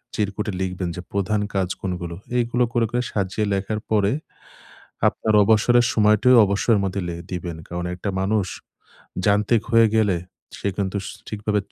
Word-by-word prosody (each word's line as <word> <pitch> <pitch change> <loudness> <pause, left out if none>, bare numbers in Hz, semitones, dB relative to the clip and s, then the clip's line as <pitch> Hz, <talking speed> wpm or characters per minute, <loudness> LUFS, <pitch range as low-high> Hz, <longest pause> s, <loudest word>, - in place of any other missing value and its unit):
চিরকুটে 105 0 -2
লিখবেন 90 -1 -2
যে 90 - -5
প্রধান 100 +1 0
কাজ 95 -2 +1
কোনগুলো। 90 -3 -4 0.2
এগুলো 120 +1 +1
করে, 120 -1 +2
করে 120 0 0
সাজিয়ে 100 +1 -1
লেখার 100 +2 -2
পরে 105 -2 +3 1.0
আপনার 110 - 0
অবসরের 115 +3 +4
সময়টিও 110 +4 +5
অবসরের 100 +2 +2
মধ্যে 95 0 -2
লে 85 - -4 0.2
দিবেন। 85 -2 -4
কারণ 85 0 -4
একটা 95 +3 -4
মানুষ 100 +1 +1 0.8
যান্ত্রিক 105 +2 +3
হয়ে 115 -1 +6
গেলে 105 -5 +3 0.4
সে - - -2
কিন্তু 100 -1 -2
স - - -5 0.2
ঠিকভাবে 105 0 -1
100 Hz, 150 wpm, -22 LUFS, 95-110 Hz, 1.0 s, হয়ে